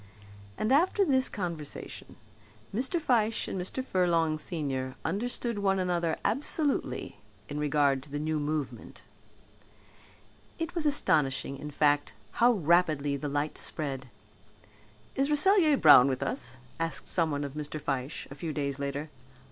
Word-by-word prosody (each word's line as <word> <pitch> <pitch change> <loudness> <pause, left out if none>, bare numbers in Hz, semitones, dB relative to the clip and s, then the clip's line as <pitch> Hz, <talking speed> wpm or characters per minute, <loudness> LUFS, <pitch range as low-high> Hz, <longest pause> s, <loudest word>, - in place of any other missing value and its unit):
And 215 - -1
after 370 +7 +3
this 260 -4 +3
conversation 170 -7 -6 0.6
Mr. 260 - 0
Fyshe 230 -7 +1
and 185 - -3
Mr. 255 +8 -4
Furlong 165 -6 +1
senior 135 -5 -3
understood 235 +4 -2
one 195 -1 +2
another 175 -3 0
absolutely 290 0 0 0.3
in 145 0 -4
regard 145 -2 +2
to 145 - -14
the 145 - -4
new 155 +1 -1
movement. 150 -1 -4 1.5
It 330 +1 -4
was 335 -4 0
astonishing 145 - +2
in 150 +2 -7
fact 145 0 +1 0.3
how 240 +1 +6
rapidly 155 -6 +2
the 145 +1 -4
light 145 +2 -2
spread. 135 -4 -2 1.1
"Is 275 +2 +1
Rasselyer 315 -1 +4
Brown 145 - +8
with 130 -1 -1
us?" 245 - -3 0.2
asked 165 0 -3
someone 155 -4 +1
of 140 -1 -5
Mr. 150 0 -5
Fyshe 135 0 -3
a - - -5
few 155 +3 -5
days 140 -2 -2
later. 140 +2 -4
160 Hz, 135 wpm, -29 LUFS, 145-230 Hz, 1.5 s, Brown